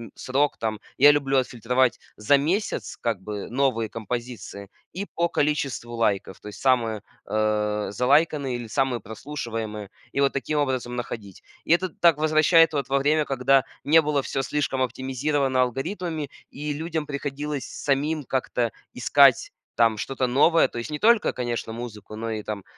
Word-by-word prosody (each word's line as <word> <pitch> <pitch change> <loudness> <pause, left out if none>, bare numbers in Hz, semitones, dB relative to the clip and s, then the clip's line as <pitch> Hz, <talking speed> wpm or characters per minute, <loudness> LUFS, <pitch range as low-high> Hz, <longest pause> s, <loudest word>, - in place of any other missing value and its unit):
срок 140 +3 0
там. 110 -2 -3 0.2
Я 145 +3 +8
люблю 135 -2 +1
отфильтровать 125 0 +1 0.2
за 125 +7 +3
месяц- 180 +10 -1
как 115 -5 -1
бы 105 0 -6
новые 125 -3 0
композиции- 115 -3 -6 0.2
и 195 +3 -4
по 170 +1 +2
количеству 140 -6 -1
лайков, 100 -4 -1
то - - -12
есть 105 - -9
самые, 115 -5 +2 0.3
э, 105 -1 0
залайканные 140 +3 +2
или 120 -1 -6
самые 125 0 0
прослушиваемые. 110 -3 -6 0.2
И 140 - 0
вот 140 - +3
таким 150 +2 -2
образом 130 -3 -1
находить. 110 -5 -7 0.2
И 165 - +4
это 185 +2 +1
так 165 -1 +3
возвращает 155 +2 +5
вот 140 -2 -2
во 140 +1 +2
время, 150 +2 +2
когда 135 0 +3 0.2
не 160 +3 +6
было 145 -2 0
всё 135 - -2
слишком 140 -3 -1
оптимизировано 130 +1 0
алгоритмами 155 - -3 0.2
и 150 +1 -4
людям 160 0 -3
приходилось 145 0 -4
самим 145 +2 -1
как-то 125 -2 -1 0.2
искать 135 +1 +4 0.2
там 115 -2 +3
что-то 130 +4 -2
новое. 145 +7 +4
То - - -9
есть 120 +6 -5
не 150 - -3
только, 235 +1 +4
конечно, 120 -2 -3
музыку, 110 -3 -8
но 115 +1 -4
и 105 -1 -4
там, 105 -2 -5
130 Hz, 160 wpm, -25 LUFS, 115-145 Hz, 0.3 s, Я